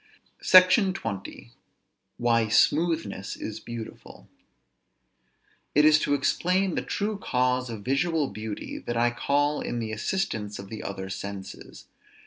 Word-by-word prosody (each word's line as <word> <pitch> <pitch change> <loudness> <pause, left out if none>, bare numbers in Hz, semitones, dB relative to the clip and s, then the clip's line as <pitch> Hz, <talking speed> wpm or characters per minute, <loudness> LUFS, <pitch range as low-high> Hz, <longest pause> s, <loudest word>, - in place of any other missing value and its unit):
SECTION 185 +2 +6
XX. 100 - -6 0.7
WHY 115 -2 +2
SMOOTHNESS 155 - +1
IS 110 - -6
BEAUTIFUL. 120 -2 -9 1.5
It 150 +1 +6
is 155 0 +6
to 145 - +1
explain 180 +6 +1
the - - -1
true 210 0 -3
cause 125 -4 0
of 110 -3 -7
visual 150 +4 +1
beauty 110 -1 -6
that 120 - -4
I 120 +1 +3
call 145 +4 0
in 120 - -3
the 115 -2 -3
assistance 110 - -2
of 100 0 -9
the 110 - -6
other 95 -1 -6
senses. 100 0 -8
120 Hz, 125 wpm, -26 LUFS, 110-160 Hz, 1.5 s, SECTION